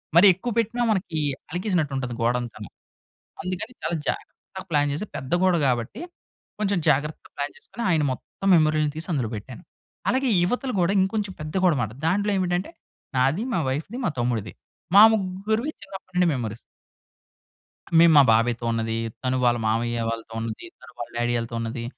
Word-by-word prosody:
మరి 170 +4 +8
ఎక్కువ 215 +7 -4
పెట్టినా 230 +2 0
మనకి 180 -6 -1 0.3
అలకేసినట్టు 180 -5 0
ఉంటుంది 125 -2 -3
గోడంతాను. 115 -3 -2 0.7
అందుకని 185 +7 -4
చాలా 170 - -1
జాగ్రత్తగా 190 - -5
ప్లాన్ 145 -2 +2
చేసి 155 +9 -3
పెద్ద 130 0 -6
గోడ 185 -1 +4
కాబట్టి 120 - -1 0.6
కొంచెం 200 -2 +1
జాగ్రత్తగా 150 +2 0
ప్లాన్ 145 0 -3
చేసుకొని 235 - -8
ఆయన 160 -4 +3
మొత్తం 195 +8 -6
మెమరీలు 155 -2 +3
తీసి 160 +2 -4
అందులో 125 -7 -1
పెట్టాను. 125 - -9 0.5
అలాగే 260 0 +2
ఇవతల 250 +8 -1
గోడ 175 0 +3
ఇంకొంచెం 200 0 -1
పెద్ద 155 0 -6
గోడనమాట. 130 - +2 0.2
దాంట్లో 205 +4 +1
ఏమిటంటే 180 - -1 0.5
నాది, 135 - +2
మా 175 - +2
వైఫ్‌ది, 155 - -3
మా 170 - +1
తమ్ముడిది 115 -5 -1 0.4
మా 200 - +10
ముగ్గురివి 215 +6 -1
చిన్నప్పటి 195 -2 -10
నుండి 180 0 +4
మెమోరీస్. 115 -4 -3 1.4
మేము 165 -1 +7
మా 145 - +10
బాబాయ్‌తో 115 +1 +2
ఉన్నది, 115 0 -1 0.3
తను 130 0 0
వాళ్ళ 120 0 +3
మామయ్య 115 +2 0
వాళ్ళతో 115 0 -6
ఉన్నది, 115 -1 -5
తను - - -14
వాళ్ళ - - -6
డ్యాడీ 120 0 0
వాళ్ళతో 115 0 -3
ఉన్నది, 115 +1 -4
155 Hz, 155 wpm, -24 LUFS, 120-190 Hz, 1.4 s, మా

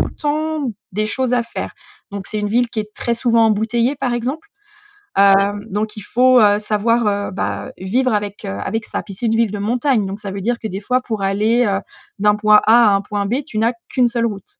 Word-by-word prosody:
le - - -1
temps 300 -3 -2 0.2
des 215 +2 -1
choses 255 +2 0
à 245 - +2
faire 230 - -6 0.4
donc, 200 -1 -6
c'est 215 - -3
une 210 - -1
ville 240 +2 +2
qui 225 - -5
est 210 0 -9
très 235 - -2
souvent 230 -1 +3
embouteillée, 230 +5 +1
par 250 -2 -1
exemple. 260 - -3 0.7
Heu, 200 0 +7 0.4
donc 210 +2 -3
il - - -6
faut, 250 +5 +4
heu, 205 0 +4
savoir, 215 +2 +1
heu, 205 -1 -1
bah, 190 - -4
vivre 245 +7 0
avec, 205 -1 -3
heu, - - -4
avec 210 - -3
ça. - - -4
Puis, 200 - -10
c'est 235 - -4
une 225 - +1
ville 230 -3 +2
de 205 - -4
montagne, 235 +1 +1
donc 195 +2 -5
ça 200 -2 -5
veut 200 - -5
dire 240 +4 0
que, 220 - -4
des 195 0 -4
fois, 255 +4 0
pour 220 -5 -4
aller, 215 +5 +2
heu, 195 -1 0 0.4
d'un 210 +1 +4
point 210 0 +5
A 230 0 +6
à 200 - +4
un 195 - +1
point 205 0 -3
B, 240 +6 0
tu 215 - -7
n'as 230 +3 +2 0.2
qu'1 250 -2 +2
seule 235 -1 0
route. 200 -4 -9
220 Hz, 240 wpm, -19 LUFS, 205-240 Hz, 0.7 s, Heu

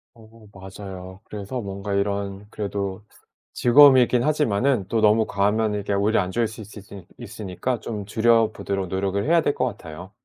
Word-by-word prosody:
어, 110 -1 -18
맞아요. 95 -1 -10
그래서 105 +4 -6
뭔가 100 0 -5
이런 100 0 -2
그래도 100 -2 -4 0.5
즐거움이 130 +1 +7
있긴 120 0 +1
하지만 135 -7 +1
또 115 +1 0
너무 110 +1 +4
과하면 105 +2 0
이게 100 0 -3
오히려 100 +2 +2
안 90 0 -4
좋을 115 +2 0
수 110 +1 -10
있수있 100 -2 -12
있으니까 110 +1 -4
좀 105 -3 -6
줄여 115 +1 +3
보도록 95 -2 -3
노력을 95 +2 -2
해야 165 +2 +4
될 145 - 0
것 130 - 0
같아요. 90 -5 -8
105 Hz, 355 characters per minute, -23 LUFS, 100-115 Hz, 0.5 s, 즐거움이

